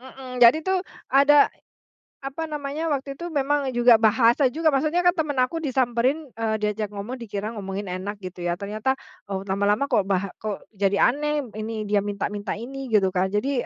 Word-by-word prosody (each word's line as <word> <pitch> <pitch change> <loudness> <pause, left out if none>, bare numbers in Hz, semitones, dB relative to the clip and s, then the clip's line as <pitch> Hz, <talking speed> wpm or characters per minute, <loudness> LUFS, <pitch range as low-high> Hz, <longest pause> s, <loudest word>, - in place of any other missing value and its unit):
Mhm. 255 -1 -9
Jadi 240 +6 +8
tuh 380 -1 +1 0.3
ada, 285 +1 +6 0.7
apa 275 +4 -5
namanya, 300 -1 -4
waktu 275 0 -3
itu 345 +3 -6
memang 280 -2 0
juga 240 -1 +7
bahasa 230 +4 +4
juga, 320 0 +1
maksudnya 310 +5 +1
kan 355 +1 +3
teman 305 -4 -1
aku 255 +7 0
disamperin, 260 +1 0
eee, 225 -1 0
diajak 210 0 -1
ngomong 205 +5 -5
dikira 210 -4 -5
ngomongin 195 0 -5
enak 185 +3 -4
gitu 185 -2 -7
ya, 175 - +1
ternyata, 215 +5 -1 0.4
oh, 195 -1 -3
lama-lama 205 +7 +1
kok 205 - +2
baha 195 0 0
kok 215 -2 -6
jadi 200 0 +1
aneh, 295 +4 -1 0.2
ini 215 +1 -4 0.2
dia 205 0 +3
minta-minta 205 0 -3
ini 265 +1 -7
gitu 200 -3 +4
kan. 185 +1 -1
Jadi 245 +5 0
240 Hz, 175 wpm, -24 LUFS, 205-280 Hz, 0.7 s, Jadi